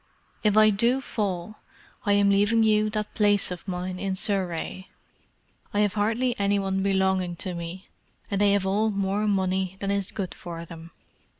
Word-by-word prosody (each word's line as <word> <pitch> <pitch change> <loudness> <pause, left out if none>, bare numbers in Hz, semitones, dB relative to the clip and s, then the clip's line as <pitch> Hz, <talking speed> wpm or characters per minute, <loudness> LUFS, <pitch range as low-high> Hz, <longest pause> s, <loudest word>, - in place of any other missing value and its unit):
"If 210 -1 +3
I 215 0 +7
do 235 +6 +2
fall, 205 -5 -3 0.5
I 205 - +4
am 200 0 +4
leaving 205 +3 +3
you 215 -1 +3
that 210 0 -3
place 205 -3 +2
of 180 +2 -7
mine 180 0 -4
in 195 -1 -2
Surrey. 185 -2 -2 0.9
I 205 - +3
have 205 -1 +2
hardly 230 +4 0
any 200 0 +2
one 195 -1 -1
belonging 190 -2 +1
to 180 +2 -4
me, 170 +2 -7 0.4
and 200 0 0
they 200 -1 +5
have 200 -1 +1
all 210 +3 +1
more 200 +1 -1
money 190 -1 0
than 200 0 -1
is 200 -2 -1
good 190 -4 -4
for 170 -1 -8
them. 165 0 -11
200 Hz, 175 wpm, -26 LUFS, 185-210 Hz, 0.9 s, I